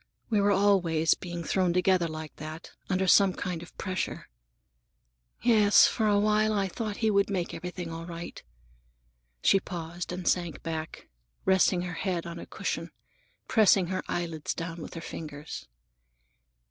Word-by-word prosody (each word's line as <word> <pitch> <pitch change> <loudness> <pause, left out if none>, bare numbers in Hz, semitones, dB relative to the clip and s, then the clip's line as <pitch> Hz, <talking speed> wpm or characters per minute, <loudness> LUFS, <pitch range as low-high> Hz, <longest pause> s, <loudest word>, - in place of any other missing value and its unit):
We 210 -2 +3
were 200 - +3
always 180 -6 +3
being 175 -2 -6
thrown 180 0 +1
together 180 -1 +3
like 155 -1 -7
that, 155 +2 -8 0.2
under 190 0 +1
some 190 0 +6
kind 180 -3 -4
of 170 - -13
pressure. 185 -1 -3 1.1
Yes, 210 -4 +6
for 220 -2 +1
a 205 -1 +4
while 215 +1 +3
I 200 -2 +1
thought 210 +2 -4
he 220 - +4
would 200 -1 +3
make 185 -4 -2
everything 180 -1 -5
right." 165 +1 -7 1.0
She 195 - +5
paused 175 -1 -6
and 180 0 -5
sank 175 -4 0
back, 160 -1 -5 0.4
resting 190 -1 +3
her 180 0 -4
head 180 -1 -2
on 170 0 -6
a - - -9
cushion, - - -3 0.6
pressing 200 -5 +4
her 185 - -1
eyelids 165 -3 -3
down 165 0 -5
with - - -8
her 165 - -5
fingers. 150 - -7
180 Hz, 150 wpm, -28 LUFS, 165-195 Hz, 1.1 s, some